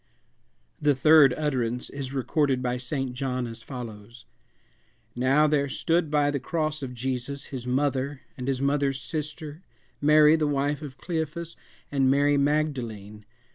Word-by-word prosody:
The 145 -1 +3
third 150 0 +7
utterance 125 -5 -1
is 135 -2 -5
recorded 135 -1 0
by 125 0 -1
St. 130 +1 -3
John 130 -1 -2
as 115 -1 -8
follows: 115 -2 -9 0.9
"Now 135 +5 +3
there 145 -2 +1
stood 165 +3 +1
by 145 -1 +2
the 140 - -1
cross 155 +2 -2
of 125 -2 -6
Jesus 130 +3 -4
his 125 -2 -5
mother, 135 +1 0
and 125 -3 -6
his 135 -1 -1
mother's 140 -1 +1
sister, 150 +3 -5 0.4
Mary 150 +1 +6
the 155 -2 +1
wife 145 +1 0
of 140 -3 -8
Cleophas, 165 0 -4 0.4
and 135 -2 +2
Mary 145 +1 +3
Magdalene. 125 -8 -1
140 Hz, 140 wpm, -26 LUFS, 125-150 Hz, 0.9 s, third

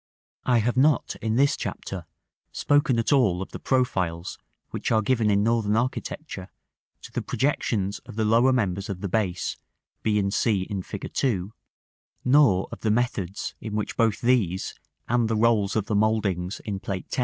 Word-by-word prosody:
§ - - -3
XIX. - - +4
I 120 - +5
have 120 +1 0
not 145 0 +3
in 110 0 0
this 140 +3 +4
chapter - - -5 0.4
spoken 145 -3 +2
at 115 +5 +2
all 105 -11 +3
of 95 - -6
the - - -7
profiles 90 -10 -1 0.3
which - - -3
are 110 -1 +3
given 115 -2 +2
in 100 0 +3
Northern 110 -2 +2
architecture 125 -3 -3 0.5
to - - -10
the - - -2
projections 105 -8 -1
of - - -12
the 110 0 0
lower 115 +4 +4
members 100 -6 0
of 95 -2 -5
the 100 - -2
base, 95 -2 -1 0.4
b 105 -1 +1
and 100 -1 0
c 105 -5 +2
in 100 -1 -4
Fig. - - -7
II., 100 -8 0 0.8
nor 125 -8 +5
of - - -7
the 110 - -1
methods 105 -5 -1
in 105 -1 -5
which 105 - -2
both 115 -3 +1
these, 110 -7 +1 0.3
and 120 -1 +2
the 110 - 0
rolls 110 -3 +2
of 110 -3 +1
the 105 - -3
mouldings 100 -3 0
in 100 -2 -4
Plate 95 -1 -4
X. - - -3
110 Hz, 185 wpm, -25 LUFS, 100-120 Hz, 0.8 s, I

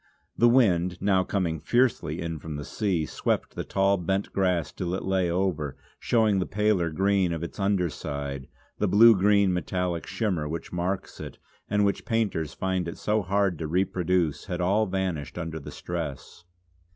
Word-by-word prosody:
The 120 - +5
wind, 90 -8 +3
now 95 -1 +2
coming 90 -5 -1
fiercely 85 - +1
in 80 -1 -4
from 80 -1 -6
the 75 0 -5
sea, 95 -7 -1
swept - - -2
the - - -4
tall 100 +1 +2
bent 95 +3 -2
grass 90 -4 +1
till 90 0 -3
it - - -4
lay 95 -2 +1
over, 85 -6 -1 0.2
showing 110 -4 +2
the 90 - -1
paler 105 -4 +1
green 95 +2 +1
of 85 0 -3
its 85 - -7
under 95 -2 +2
side; 70 -3 -5 0.3
the 105 - +2
blue 110 +4 +7
green, 100 0 +3
metallic 90 -1 -2
shimmer 90 -10 -1
which 85 +2 -6
marks 90 +2 -3
it, - - -8 0.3
and 105 0 +2
which 100 - 0
painters 100 -9 -1
find 95 -2 -1
it 85 - -6
so 105 +1 0
hard 95 -2 0
to 80 - -3
reproduce, 90 -2 0
had 90 - -4
all 100 +5 +2
vanished 90 -7 -3
under 80 -2 -4
the 70 - -9
stress. 85 -1 -6
90 Hz, 175 wpm, -26 LUFS, 85-100 Hz, 0.3 s, blue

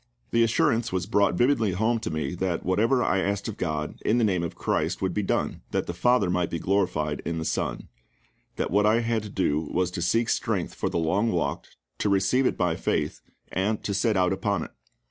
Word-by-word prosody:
The 115 - +3
assurance 115 0 +2
was 90 -2 -1
brought 100 -3 +2
vividly 120 -4 +2
home 110 +5 +1
to 110 - -4
me 80 -2 -2
that 90 -1 -2
whatever 115 +8 +2
I 95 - +2
asked 100 +3 -1
of 110 - -5
GOD 75 -3 -3
in 115 - +2
the 120 - +3
name 95 -5 +2
of 85 - -4
CHRIST 80 +4 -1
would 95 - -1
be 105 - 0
done, 95 - -1
that - - -1
the 85 - -4
FATHER 100 +1 +2
might 90 -1 0
be 85 - -2
glorified 85 -5 0
in 85 -1 -3
the 80 - -3
SON; - - -2 0.7
that - - -2
what 105 +2 +3
I 115 +2 +4
had 115 -1 0
to 105 - -8
do 85 -6 +1
was 90 +3 -1
to 90 - -4
seek 115 +7 +1
strength - - -1
for - - -2
the - - -2
long 95 +8 +1
walk, 80 -5 -1 0.3
to 105 - +1
receive 100 +7 +3
it - - -1
by 90 -3 +1
faith, - - -1 0.3
and 100 +3 -1
to 100 - -2
set 105 +1 +1
out 90 0 +3
upon 100 +1 -1
it. - - -9
95 Hz, 220 wpm, -26 LUFS, 85-110 Hz, 0.7 s, I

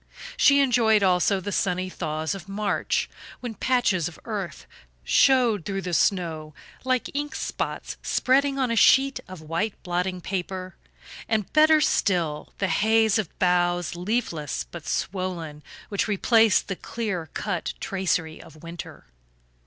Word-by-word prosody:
She 280 0 +5
enjoyed, 230 -5 +3
also, 185 +1 +3
the 205 +2 -5
sunny 185 -1 0
thaws 155 -2 -3
of 195 -1 -9
March, 205 +1 -1 0.3
when 245 -3 -5
patches 210 -7 +1
of 175 - -10
earth 205 -6 -5 0.4
showed 245 -8 +4
through 195 +2 -3
the 180 - -4
snow, 160 -5 0 0.3
like 255 -1 0
ink 295 +1 -3
spots - - -4
spreading 275 +2 +2
on 260 -3 0
a - - +1
sheet 270 +4 +5
of 185 -3 -10
white 170 +7 -2
blotting 180 +1 -2
paper; 185 0 -4 0.5
and, 215 -3 -1
better 310 0 +6
still, 170 - 0
the 195 - 0
haze 220 0 +3
of 195 -7 -5
boughs, 175 -2 +1
leafless 175 -5 -2
but 165 -2 -11
swollen, 175 -6 -3 0.3
which 200 +1 -1
replaced 220 +1 +3
the 195 - -3
clear 190 -7 -4
cut 180 -5 -3
tracery 180 -4 -2
of 160 -1 -16
winter. 170 +1 -9
190 Hz, 135 wpm, -25 LUFS, 175-225 Hz, 0.5 s, better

